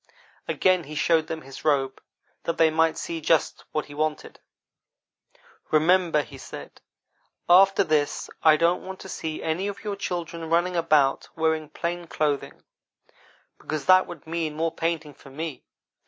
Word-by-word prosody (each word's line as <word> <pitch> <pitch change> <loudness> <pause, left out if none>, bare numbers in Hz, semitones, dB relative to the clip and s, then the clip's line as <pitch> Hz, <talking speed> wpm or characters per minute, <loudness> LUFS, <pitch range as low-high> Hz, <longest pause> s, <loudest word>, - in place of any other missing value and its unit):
Again 185 -3 +2
he 155 +2 -8
showed 160 +1 +2
them 160 0 -5
his 135 0 -11
robe, 135 -3 +1 0.4
that 170 - -1
they 160 -1 +5
might 160 0 +2
see 165 -1 -4
just 160 +1 +1
what 155 - -2
he 145 - -12
wanted. 155 +1 -3 1.3
"'Remember,' 160 0 +3
he - - -12
said, - - -10 0.7
'after 195 +2 +6
this 150 -2 0
I 155 -1 +6
don't 170 +3 +2
want 190 0 -8
to - - -9
see 160 -3 -5
any 165 +5 -1
of 205 +1 -6
your 205 -2 -3
children 170 -4 -4
running 175 +2 +2
about 155 -5 +2
wearing 160 -1 0
plain 175 0 -4
clothing, 150 -3 -2 1.0
because 155 -2 -4
that 185 0 +6
would 170 -4 -10
mean 160 -2 -3
more 165 +1 0
painting 165 -3 -2
for 135 - -16
me. 155 +2 -6
160 Hz, 155 wpm, -25 LUFS, 155-170 Hz, 1.3 s, after